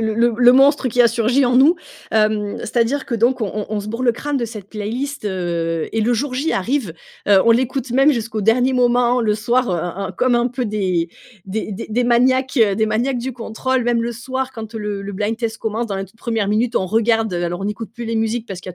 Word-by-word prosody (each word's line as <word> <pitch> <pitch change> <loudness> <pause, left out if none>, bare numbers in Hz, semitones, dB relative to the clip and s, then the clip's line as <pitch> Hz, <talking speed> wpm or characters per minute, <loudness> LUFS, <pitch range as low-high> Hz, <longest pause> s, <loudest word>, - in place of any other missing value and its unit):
le 220 -1 0
le 235 +2 +3
le 245 0 +6
monstre 275 +1 +4
qui 245 +1 +1
a 235 - +7
surgi 240 +4 +2
en 245 - +2
nous, 295 +7 +6 0.3
hem, 215 -1 +1
c'est-à-dire 240 +4 -1
que 245 - -2
donc 240 +3 +2
on 210 -3 -1
on 210 -1 -2
on 215 -1 -1
se 205 - -7
bourre 230 +3 -4
le 240 -2 +3
crâne 290 +4 -3
de 245 - -1
cette 210 -4 -8
playlist, 230 +6 -4
heu, 170 -4 -2
et 225 - 0
le 240 +3 +2
jour 255 +3 -1
J 290 +5 -1
arrive, 225 - -1 0.3
heu, 200 -2 +6
on 230 - +7
l'écoute 260 +1 -1
même 270 +4 +4
jusqu'au 220 -3 -3
dernier 245 +5 +3
moment, 245 0 +3
le 210 -1 +2
soir, 240 +2 0
heu 180 - 0
heu 175 +4 -4
heu, - - -7
comme 250 -1 +3
un 240 0 +2
peu 250 0 -3
des 185 -5 -1 0.4
des 210 +2 -4
des 190 - -6
des 240 +3 0
maniaques, 255 +2 +2
heu 205 -4 +4
des 220 - +2
maniaques 235 +5 0
du 250 +2 -3
contrôle 250 +2 -2
même 235 -1 +1
le 235 +1 -2
soir 260 +3 -4
quand, 225 -2 -8
heu, - - -3
le 210 -1 -4
le 200 +1 -6
blind 215 +3 -1
test 230 -2 -3
commence 225 +2 -3
dans 200 -2 -3
la 195 - -3
toute 195 +4 -21
1re 225 -4 -1
minute, 225 +3 +1
on 190 - +1
regarde 225 +1 +1
alors 175 +1 -2
on - - -4
n'écoute 210 +2 -4
plus 240 -1 -6
les 230 0 -2
musiques 225 +1 -1
parce 190 -3 -7
qu'il - - -10
y 180 - -7
230 Hz, 255 wpm, -19 LUFS, 210-250 Hz, 0.4 s, a